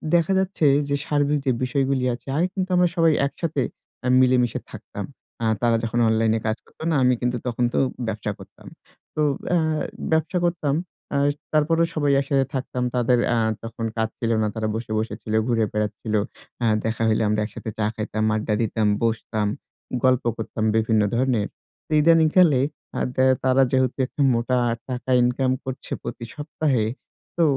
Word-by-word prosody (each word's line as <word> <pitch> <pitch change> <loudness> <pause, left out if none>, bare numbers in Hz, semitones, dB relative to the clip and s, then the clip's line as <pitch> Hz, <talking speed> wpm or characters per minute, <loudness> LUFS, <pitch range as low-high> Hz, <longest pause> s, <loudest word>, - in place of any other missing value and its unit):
দেখা 170 +3 +3
যাচ্ছে 190 -4 0 0.2
যে, 140 - +2
সার্বিক 145 -1 +1
যে 130 - +3
বিষয়গুলি 135 -1 0
আছে 120 - -10
আগে 175 - +2
কিন্তু 185 -1 -2
আমরা 180 0 +5
সবাই 165 -2 +4
একসাথে 155 0 -2 0.4
আ - - +1
মিলেমিশে 125 -2 +3
থাকতাম। - - -7 0.4
আ - - +1 0.2
তারা 120 -1 +3
যখন 115 +1 -1
অনলাইনে 110 0 +2
কাজ 110 +1 0
করতো - - -13
না, - - +2
আমি 125 0 +5
কিন্তু 125 0 0
তখন 120 0 -1
তো - - +2 0.3
ব্যবসা 105 -1 -2
করতাম। - - -14 0.5
তো 155 - 0 0.3
অ্যা 175 - +3 0.5
ব্যবসা 160 +3 +1
করতাম 155 -5 0 0.4
অ্যা 140 - +1 0.3
তারপরও 165 +2 +3
সবাই 145 -2 +1
একসাথে 140 -1 +1
থাকতাম। 125 -1 -2
তাদের 125 0 +3
অ্যা 120 - +2 0.2
তখন 115 0 -5
কাজ 110 0 +1
ছিল 115 -1 0
না। 105 - +2
তারা 110 -1 -1
বসে, 115 -1 -5
বসেছিল, 110 0 -4
ঘুরে 115 -2 +2
বেড়াচ্ছিল। 105 +1 -2 0.4
অ্যা 120 - +1 0.2
দেখা 115 0 -1
হইলে 110 0 +2
আমরা 105 0 +1
একসাথে 110 +1 -7
চা 105 - +2
খাইতাম, 110 0 -2
আড্ডা 110 0 -1
দিতাম, 110 -1 0 0.2
বসতাম, 110 -2 0 0.6
গল্প 130 -1 +3
করতাম 110 0 -4
বিভিন্ন 110 -1 +3
ধরনের। 120 -4 +1 0.4
তো - - -17
ইদানীং 165 +1 +5
কালে 160 -8 +6 0.4
আ - - 0 0.2
দে 130 - +3 0.2
তারা 130 0 +4
যেহেতু 130 -1 +1
একটা 145 - -5
মোটা 120 +2 +1 0.3
টাকা 125 +1 -5
ইনকাম 130 +1 +1
করছে 130 0 -7
প্রতি 115 - -6
সপ্তাহে, 145 -6 0 0.5
তো 170 - +4
125 Hz, 170 wpm, -23 LUFS, 110-145 Hz, 0.6 s, কালে